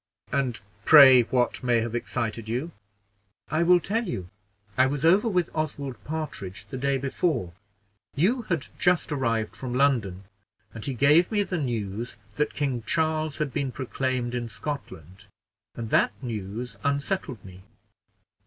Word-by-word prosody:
"And 130 Hz, -4 st, 0 dB, 0.2 s
pray 135 Hz, -5 st, +9 dB
what 125 Hz, +1 st, 0 dB
may 120 Hz, -2 st, +2 dB
have 115 Hz, 0 st, -3 dB
excited 115 Hz, -2 st, -3 dB
you?" 130 Hz, +9 st, -2 dB, 0.8 s
"I 155 Hz, +2 st, +1 dB
will 175 Hz, +1 st, +5 dB
tell 225 Hz, +7 st, -1 dB
you: 95 Hz, -, -5 dB, 0.4 s
I 130 Hz, +1 st, +4 dB
was 145 Hz, +3 st, -2 dB
over 190 Hz, +7 st, +5 dB
with 180 Hz, -6 st, 0 dB
Oswald 140 Hz, -7 st, -4 dB
Partridge 125 Hz, -12 st, -5 dB
the 105 Hz, -, -7 dB
day 140 Hz, +1 st, +1 dB
before; 135 Hz, -, -1 dB, 0.6 s
you 205 Hz, -, +2 dB
had 170 Hz, -6 st, 0 dB
just 180 Hz, -2 st, +2 dB
arrived 115 Hz, -6 st, -1 dB
from 125 Hz, -2 st, -5 dB
London, 115 Hz, -9 st, +1 dB, 0.5 s
and 115 Hz, -, -8 dB
he 135 Hz, -, -2 dB
gave 150 Hz, -, +4 dB
me 205 Hz, -2 st, +2 dB
the 180 Hz, -3 st, -3 dB
news 115 Hz, -4 st, -3 dB, 0.2 s
that 150 Hz, 0 st, 0 dB
King 135 Hz, -5 st, -1 dB
Charles 155 Hz, -2 st, 0 dB
had 150 Hz, -3 st, -2 dB
been 140 Hz, -3 st, -1 dB
proclaimed 130 Hz, -1 st, -2 dB
in 120 Hz, -1 st, -3 dB
Scotland, 95 Hz, -, -7 dB, 0.5 s
and 115 Hz, -2 st, -6 dB
that -, -, +3 dB
news 110 Hz, -2 st, -5 dB
unsettled 140 Hz, -, -2 dB
me." 95 Hz, -1 st, -12 dB
130 Hz, 145 wpm, -26 LUFS, 115-155 Hz, 0.8 s, pray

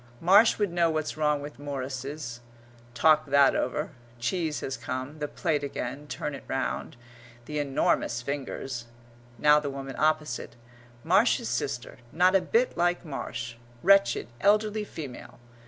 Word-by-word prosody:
"Marsh 200 Hz, +6 st, +6 dB
would 205 Hz, -4 st, 0 dB
know 170 Hz, -1 st, +3 dB
what's 155 Hz, -1 st, -2 dB
wrong 150 Hz, -2 st, +1 dB
with 145 Hz, -3 st, -9 dB
Morrises 135 Hz, -2 st, -5 dB, 0.3 s
..." 120 Hz, 0 st, -25 dB
talk 155 Hz, +3 st, +4 dB
that 140 Hz, 0 st, +5 dB
over; 150 Hz, +6 st, -1 dB, 0.3 s
cheese 155 Hz, +6 st, -1 dB
has 135 Hz, -, -3 dB
come; 130 Hz, +4 st, -5 dB
the 150 Hz, -, -2 dB
plate 145 Hz, 0 st, -1 dB
again; 140 Hz, +1 st, -5 dB
turn 150 Hz, -, -4 dB
it -, -, -8 dB
round 135 Hz, -1 st, -3 dB, 0.5 s
the 150 Hz, +2 st, -3 dB
enormous 135 Hz, -3 st, +1 dB
fingers; 135 Hz, -3 st, -4 dB, 0.5 s
now 150 Hz, +5 st, +6 dB
the 145 Hz, -1 st, -3 dB
woman 135 Hz, -1 st, -6 dB
opposite. 155 Hz, -6 st, 0 dB, 0.5 s
"Marsh's -, -, +3 dB
sister -, -, -3 dB
not 180 Hz, +4 st, +4 dB
a 190 Hz, -, +5 dB
bit 240 Hz, +6 st, +1 dB
like 175 Hz, +1 st, +1 dB
Marsh; 120 Hz, -5 st, -5 dB, 0.3 s
wretched, 195 Hz, +1 st, +5 dB
elderly 210 Hz, +1 st, +2 dB
female.... 145 Hz, -10 st, -8 dB
145 Hz, 140 wpm, -28 LUFS, 130-160 Hz, 0.5 s, Marsh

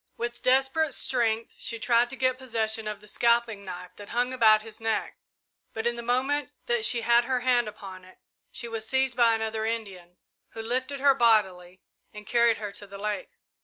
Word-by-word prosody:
With 240 Hz, 0 st, -4 dB
desperate 270 Hz, +4 st, +2 dB
strength 230 Hz, -3 st, 0 dB
she 230 Hz, -, -2 dB
tried 235 Hz, +1 st, +2 dB
to 265 Hz, -, -6 dB
get 255 Hz, -1 st, 0 dB
possession 225 Hz, -3 st, 0 dB
of 210 Hz, -1 st, -5 dB
the 210 Hz, -, -15 dB
scalping 235 Hz, -2 st, +1 dB
knife 180 Hz, -1 st, -8 dB
that 205 Hz, -1 st, -11 dB
hung 245 Hz, +2 st, 0 dB
about 215 Hz, -3 st, +5 dB
his 220 Hz, 0 st, -11 dB
neck, 225 Hz, -1 st, -2 dB, 0.6 s
but 220 Hz, 0 st, -3 dB
in 235 Hz, 0 st, +1 dB
the 235 Hz, -, -6 dB
moment 255 Hz, +4 st, 0 dB, 0.2 s
that 240 Hz, -2 st, +1 dB
she 235 Hz, +1 st, +3 dB
had 235 Hz, +1 st, +4 dB
her 255 Hz, 0 st, -1 dB
hand 245 Hz, -2 st, +2 dB
upon 195 Hz, -3 st, -9 dB
it 185 Hz, 0 st, -17 dB, 0.3 s
she 235 Hz, -, -5 dB
was 225 Hz, -1 st, -6 dB
seized 265 Hz, 0 st, +1 dB
by 235 Hz, -2 st, +4 dB
another 220 Hz, 0 st, -3 dB
Indian, 195 Hz, -6 st, -5 dB, 0.4 s
who 225 Hz, -, -6 dB
lifted 260 Hz, +4 st, -2 dB
her 280 Hz, -1 st, +6 dB
bodily 190 Hz, -7 st, +1 dB, 0.3 s
and 210 Hz, -1 st, -11 dB
carried 235 Hz, 0 st, +3 dB
her 205 Hz, -1 st, -6 dB
to 205 Hz, 0 st, -10 dB
the 200 Hz, 0 st, -10 dB
lake. 210 Hz, 0 st, -4 dB
230 Hz, 195 wpm, -27 LUFS, 210-245 Hz, 0.6 s, her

